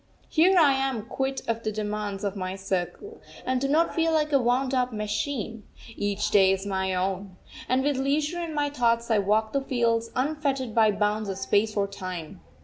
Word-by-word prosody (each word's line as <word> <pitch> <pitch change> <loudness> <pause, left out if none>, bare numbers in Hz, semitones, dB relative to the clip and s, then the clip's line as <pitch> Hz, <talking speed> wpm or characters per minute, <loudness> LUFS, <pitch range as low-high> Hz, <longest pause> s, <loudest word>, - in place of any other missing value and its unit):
Here 360 +4 +4
I 300 -5 +6
am 270 -5 -1
quit 270 +2 -2
of 230 0 -1
the 215 - -2
demands 210 -1 -3
of 200 -1 -2
my 185 -1 -4
circle, 195 - -4 0.2
and 255 0 0
do 275 - +1
not 315 +4 +2
feel 330 0 +1
like 305 -1 +1
a 275 - +5
wound 255 +2 +1
up 250 -1 +1
machine. 220 +1 -3 0.3
Each 205 +1 -1
day 190 -2 +6
is 195 +1 -1
my 190 -1 -1
own. 190 0 -2 0.3
And 255 +1 +2
with 285 -1 +1
leisure 295 +5 0
and 330 -3 -4
my 290 -1 0
thoughts 235 -3 +1
I 220 - +4
walk 215 +2 +1
the 275 - +1
fields, 230 -4 0
unfettered 275 -3 -1
by 220 -1 +5
bounds 210 0 0
of 190 - -3
space 210 +2 +1
or 200 - +2
time. 185 -5 -7
230 Hz, 195 wpm, -26 LUFS, 200-275 Hz, 0.3 s, I